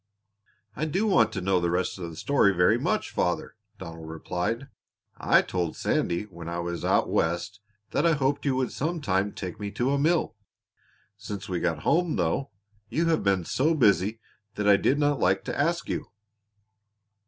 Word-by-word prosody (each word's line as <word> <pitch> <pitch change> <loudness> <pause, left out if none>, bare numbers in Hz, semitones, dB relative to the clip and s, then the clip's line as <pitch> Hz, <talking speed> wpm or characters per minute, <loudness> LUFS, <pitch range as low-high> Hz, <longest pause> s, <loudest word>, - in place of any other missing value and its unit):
"I 155 - -1
do 185 +8 0
want 115 - +4
to 95 - -3
know 95 0 +2
the 85 -1 0
rest 90 +2 -1
of 85 -2 -5
the 80 - -10
story 100 - +2
very 90 0 +4
much, - - -1
father," - - -1 0.2
Donald 80 -1 -9
replied. 90 +10 -3 0.5
"I - - +4
told 90 -3 -2
Sandy 85 +3 0
when 85 -5 -9
I 85 - -3
was 85 0 -4
out - - +2
West 85 +5 -1 0.3
that 145 - +1
I 170 -1 +4
hoped 140 0 0
you 140 -3 +1
would 130 -1 -1
some 165 +4 -2
time 100 -6 0
take 90 -3 -7
me 105 -1 -4
to 120 +6 0
a 140 - +1
mill. 155 -6 +1 0.8
Since 100 -1 -7
we 90 -2 -1
got 80 -3 -1
home, 170 -1 +2
though, 90 - 0 0.4
you 165 +1 +1
have 160 - +2
been 95 -3 +1
so 155 - +1
busy 105 -4 +3 0.4
that 105 0 -1
I 100 - +7
did 130 +7 +2
not 145 -1 +1
like - - +2
to - - -4
ask - - 0
you." - - -3
105 Hz, 185 wpm, -27 LUFS, 90-140 Hz, 0.8 s, I